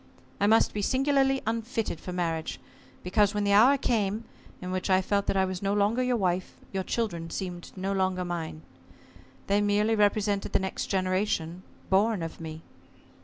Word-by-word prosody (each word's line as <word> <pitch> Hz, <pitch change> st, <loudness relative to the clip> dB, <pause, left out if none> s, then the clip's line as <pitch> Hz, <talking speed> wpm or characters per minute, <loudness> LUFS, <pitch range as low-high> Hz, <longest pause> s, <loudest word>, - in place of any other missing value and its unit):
I 205 Hz, -, +3 dB
must 225 Hz, +2 st, +4 dB
be 210 Hz, -, -2 dB
singularly 270 Hz, +3 st, +2 dB
unfitted 225 Hz, -4 st, -2 dB
for 180 Hz, -, -7 dB
marriage, 165 Hz, -3 st, -2 dB, 0.4 s
because, 205 Hz, +2 st, +2 dB
when 205 Hz, -, 0 dB
the 200 Hz, 0 st, +2 dB
hour 245 Hz, +7 st, +6 dB
came 220 Hz, -3 st, 0 dB, 0.3 s
in 180 Hz, 0 st, -5 dB
which 185 Hz, +1 st, -2 dB
I 185 Hz, 0 st, +5 dB
felt 200 Hz, +1 st, 0 dB
that -, -, +1 dB
I 190 Hz, -, +3 dB
was 185 Hz, -1 st, -4 dB
no 200 Hz, 0 st, 0 dB
longer 210 Hz, +4 st, +2 dB
your 250 Hz, -1 st, +1 dB
wife, 185 Hz, -2 st, -1 dB, 0.2 s
your 190 Hz, -, 0 dB
children 185 Hz, -5 st, -2 dB
seemed 175 Hz, -1 st, -5 dB
no 195 Hz, +1 st, -2 dB
longer 185 Hz, -1 st, 0 dB
mine. 165 Hz, -3 st, -5 dB, 0.8 s
They 200 Hz, +1 st, +2 dB
merely 205 Hz, +2 st, +2 dB
represented 205 Hz, -1 st, +1 dB
the -, -, +4 dB
next 190 Hz, 0 st, -3 dB
generation 185 Hz, -2 st, -1 dB, 0.3 s
born 200 Hz, -1 st, +3 dB
of 165 Hz, 0 st, -7 dB
me. 160 Hz, 0 st, -7 dB
195 Hz, 170 wpm, -28 LUFS, 185-215 Hz, 0.8 s, hour